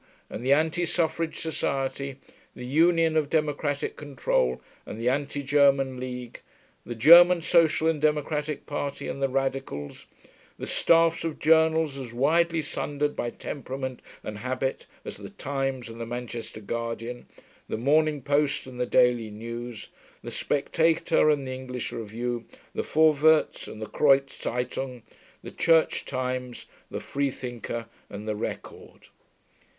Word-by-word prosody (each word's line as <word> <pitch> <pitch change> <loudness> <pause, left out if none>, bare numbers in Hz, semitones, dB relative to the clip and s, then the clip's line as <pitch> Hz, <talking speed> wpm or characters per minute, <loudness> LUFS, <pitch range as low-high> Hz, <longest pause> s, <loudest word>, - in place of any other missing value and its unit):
and 115 - -6
the 130 - +1
Anti 160 +4 +3
Suffrage 165 -1 0
Society, 140 -4 -2 0.4
the 125 - -7
Union 165 +3 +3
of 155 -2 +1
Democratic 150 -2 -1
Control 125 - 0 0.2
and 110 - -8
the 115 - -2
Anti 145 +2 -1
German 135 -2 +3
League, 125 -1 -6 0.4
the 120 - -6
German 170 +8 +8
Social 160 -2 +3
and 160 -3 +1
Democratic 150 0 0
Party 145 -1 -4
and 140 - -5
the 135 - +2
Radicals; 135 - -3 0.5
the - - -5
staffs 165 0 +3
of 165 -2 -3
journals 160 -2 +3
as 120 -3 -8
widely 165 +5 +2
sundered 145 0 -2
by 120 - -2
temperament 130 -1 -6 0.2
and 105 -1 -6
habit 130 +3 -3 0.2
as - - -6
the - - -9
Times 135 -2 -3
and 115 0 -9
the 115 - -4
Manchester 120 -2 -6
Guardian, 115 +2 -5 0.4
the - - -2
Morning 150 +3 +2
Post 145 0 +1
and 130 -1 -10
the 125 - 0
Daily 120 -3 +3
News, 115 +1 -7 0.3
the - - -6
Spectator 160 +2 +2
and 145 -2 +1
the 130 - -5
English 130 -1 -5
Review, 115 +2 -4 0.3
the - - -1
Vorwärts 155 0 +3
and - - -9
the 110 - -4
Kreuz 135 +3 +3
Zeitung, 125 0 -3 0.4
the - - -8
Church 165 -1 +2
Times, 130 -1 -4 0.2
the - - -4
Freethinker 125 -4 -3 0.2
and 105 +2 -8
the 105 - -1
Record. 105 - -7
135 Hz, 140 wpm, -26 LUFS, 125-155 Hz, 0.5 s, German